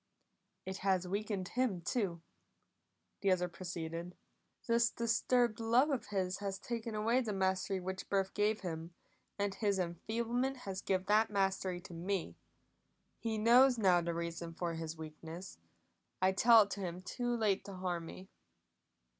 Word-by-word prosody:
"It 190 0 -4
has 190 -2 +1
weakened 200 -1 -2
him, 245 -7 0
too," 170 -4 -1 1.0
the 200 - +2
other 180 -1 +2
proceeded. 170 -1 -6 0.5
"This 235 0 +3
disturbed 235 0 +1
love 240 +6 +3
of 270 - -2
his 190 -2 -1
has 195 -1 -3
taken 230 +1 -4
away 230 +4 +2
the 220 -4 -2
mastery 190 0 0
which 190 +1 -5
birth 195 -1 +1
gave 210 +1 +1
him, 165 -1 -5 0.4
and 200 -1 0
his 200 -1 0
enfeeblement 230 +9 -1
has 195 -1 -4
given 185 -1 0
that 215 +2 +4
mastery 190 -3 0
to 180 -1 -11
me. 180 +2 -2 0.8
He 225 -1 -2
knows 245 +4 +6
now 185 -5 +4
the 170 0 -2
reason 170 0 -4
for 175 -2 -2
his 160 0 -5
weakness; 160 - -8 0.6
I 185 +1 +4
tell 225 +3 +7
it 200 - -10
to 200 - -4
him 180 0 -4
too 240 +4 -2
late 210 -4 +1
to 200 - -7
harm 175 -3 -3
me." 190 +3 -10
195 Hz, 155 wpm, -35 LUFS, 180-220 Hz, 1.0 s, tell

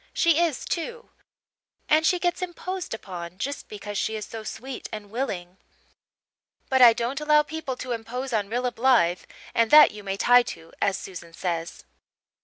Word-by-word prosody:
She 335 -2 +3
is 335 -6 0
too. 470 +8 -4 0.8
And 315 +1 +4
she 360 - +3
gets 350 0 -1
imposed 365 -3 -4
upon, 180 -4 -8
just 280 +8 -5
because 205 -1 -5
she 220 - -1
is 215 - -4
so 225 - -7
sweet 255 +4 -7
and 210 -2 -8
willing; 190 -7 -4 1.1
but 265 -1 +3
I 240 -2 +10
don't 240 +5 -2
allow 300 0 +4
people 305 -4 -5
to 250 0 -6
impose 245 +3 -4
on 205 -3 0
Rilla 245 +2 -1
Blythe 230 -9 +3 0.3
and 230 -1 +2
'that 300 0 +9
you 210 -1 -10
may 195 0 -3
tie 245 +4 +6
to,' 165 -8 -9
as 200 -2 +2
Susan 170 -3 -9
says. 170 -1 -4
240 Hz, 170 wpm, -25 LUFS, 200-300 Hz, 1.1 s, I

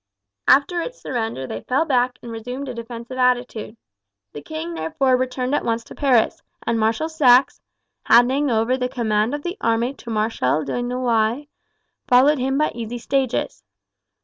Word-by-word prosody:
After 340 +6 +4
its - - -7
surrender 225 - -3
they 115 -3 -6
fell 270 +6 0
back 250 -4 +1
and 235 - -7
resumed 245 +5 -6
a 255 - -4
defensive 235 +2 -7
attitude. 245 -3 0 0.6
The 145 - -7
king 155 +3 -6
therefore 170 +12 +1
returned 255 +1 -2
at - - +1
once 230 0 -1
to - - -12
Paris, 255 -6 +2 0.2
and 230 -1 0
Marshal 225 +8 +1
Saxe, 270 -5 +4 0.4
handing 260 +4 +4
over 230 +2 +1
the 250 -1 -2
command 220 0 0
of 290 - -7
the 355 +4 -4
army 230 +3 +1
to 245 - -12
Marshal 215 - 0
de 145 - -3
Noailles, 245 +2 0 0.6
followed 270 +4 +5
him 265 +2 0
by 305 +1 +1
easy 235 0 -5
stages. 260 +1 -2
245 Hz, 160 wpm, -21 LUFS, 225-265 Hz, 0.6 s, followed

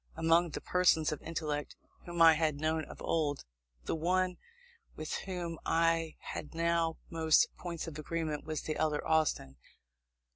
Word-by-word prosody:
Among 165 +1 +3
the - - -5
persons 175 -4 +3
of 155 - -4
intellect 155 -3 -3 0.3
whom 170 -1 +2
I 165 -1 +9
had 155 -1 +1
known 155 0 0
of - - -11
old, 150 -3 0 0.4
the - - -1
one 180 +3 +1 0.6
with 155 0 -5 0.2
whom 175 -3 -4
I 165 -1 +1
had 150 - -7
now 165 -1 +1
most 160 -1 +4
points 170 -2 -5
of 155 -2 -7
agreement 155 -1 -3
was 155 -1 -4
the 155 - -2
elder 150 -1 0
Austin. 155 - +1
160 Hz, 150 wpm, -32 LUFS, 155-165 Hz, 0.6 s, I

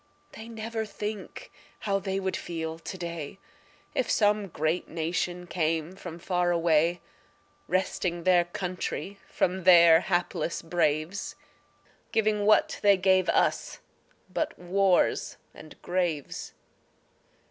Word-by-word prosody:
They 220 - -10
never 225 0 -4
think 210 -1 -6 0.3
how 200 -1 0
they 190 0 -2
would 190 -1 -2
feel 160 -1 -5
to 185 - -7
day, 170 -2 -6 0.6
If - - -1
some 210 -1 +2
great 160 0 -1
nation 175 +2 -2
came 165 0 -1
from 175 -3 -8
far 180 0 0
away, 170 0 +2 0.7
Wresting 180 -1 -1
their 180 -1 +4
country 185 +2 -4
from 185 0 0
their 170 -2 +8
hapless 175 -2 -1
braves, 165 +2 -1 0.8
Giving 210 -2 +1
what 215 - +4
they 200 -1 +5
gave 185 0 +3
us - - +1 0.6
but - - -2
wars 185 +1 +1 0.2
and 155 - -13
graves. 175 -5 -2
180 Hz, 115 wpm, -28 LUFS, 170-195 Hz, 0.8 s, their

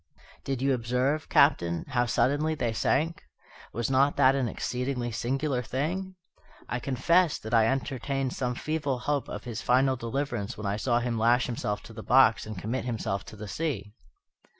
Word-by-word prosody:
"Did 135 -1 -2
you 135 0 +3
observe, 125 +5 0
Captain, 85 - +3
how 120 -3 +1
suddenly 145 +6 +1
they 120 -6 -1
sank? 160 +8 0 0.5
Was 120 +3 -2
not 135 +2 +3
that 135 -1 +6
an 135 -3 0
exceedingly 125 +1 -3
singular 130 +3 -1
thing? 175 +10 -3 0.5
I 125 - -2
confess 160 +7 +2
that 110 +2 -7
I 115 -1 +5
entertained 135 0 -1
some 125 -1 -2
feeble 150 -2 -2
hope 140 +2 -2
of - - -6
his 120 -3 -5
final 130 +2 +3
deliverance 120 -2 -3
when 105 - -6
I 100 +1 0
saw 120 +2 +1
him 120 -2 -1
lash 120 +2 +3
himself 105 -4 -3
to 115 - -12
the 110 - -8
box 120 -2 +4
and 110 -2 -6
commit 115 +8 -3
himself 110 -5 -2
to - - -11
the 105 0 -8
sea." 110 - -3
125 Hz, 175 wpm, -28 LUFS, 115-140 Hz, 0.5 s, that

